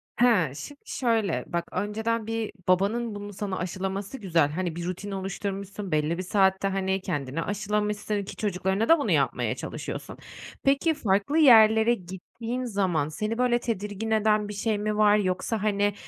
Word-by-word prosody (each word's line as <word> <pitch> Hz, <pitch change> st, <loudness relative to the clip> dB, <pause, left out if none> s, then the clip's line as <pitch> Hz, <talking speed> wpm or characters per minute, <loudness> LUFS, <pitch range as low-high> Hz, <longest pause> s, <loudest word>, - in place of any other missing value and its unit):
Ha, 205 Hz, -, +3 dB
şim 290 Hz, -, -8 dB
şöyle 220 Hz, -, 0 dB
bak 170 Hz, 0 st, -3 dB
önceden 220 Hz, +3 st, -2 dB
bir 225 Hz, -1 st, -2 dB, 0.2 s
babanın 205 Hz, +5 st, +1 dB
bunu 205 Hz, 0 st, -7 dB
sana 195 Hz, -1 st, -3 dB
aşılaması 190 Hz, +5 st, -4 dB
güzel. 165 Hz, -, +2 dB
Hani, 175 Hz, 0 st, -3 dB
bir 170 Hz, 0 st, -4 dB
rutin 185 Hz, +3 st, -5 dB
oluşturmuşsun 195 Hz, 0 st, -5 dB
belli 155 Hz, +2 st, +1 dB
bir 185 Hz, -, -3 dB
saatte, 190 Hz, 0 st, +2 dB
hani, 190 Hz, 0 st, -1 dB
kendini 145 Hz, -1 st, -3 dB
aşılamışsın 210 Hz, +1 st, -1 dB
ki 195 Hz, -, -8 dB
çocuklarına 195 Hz, -, -1 dB
da 330 Hz, -1 st, +7 dB
bunu -, -, -1 dB
yapmaya -, -, +1 dB
çalışıyorsun. -, -, -6 dB, 0.5 s
Peki, 280 Hz, +4 st, +3 dB
farklı 205 Hz, +5 st, 0 dB
yerlere 225 Hz, -5 st, +7 dB
gittiğin 225 Hz, +6 st, -6 dB
zaman 185 Hz, -9 st, 0 dB
seni 215 Hz, +8 st, -3 dB
böyle 245 Hz, -1 st, +2 dB
tedirgin 220 Hz, -1 st, -3 dB
eden 215 Hz, -1 st, +2 dB
bir -, -, -5 dB
şey 210 Hz, +1 st, -1 dB
mi 210 Hz, 0 st, -2 dB
var? 210 Hz, 0 st, +5 dB
Yoksa, 200 Hz, +2 st, -1 dB
hani, 205 Hz, -1 st, +1 dB
205 Hz, 155 wpm, -26 LUFS, 190-220 Hz, 0.5 s, da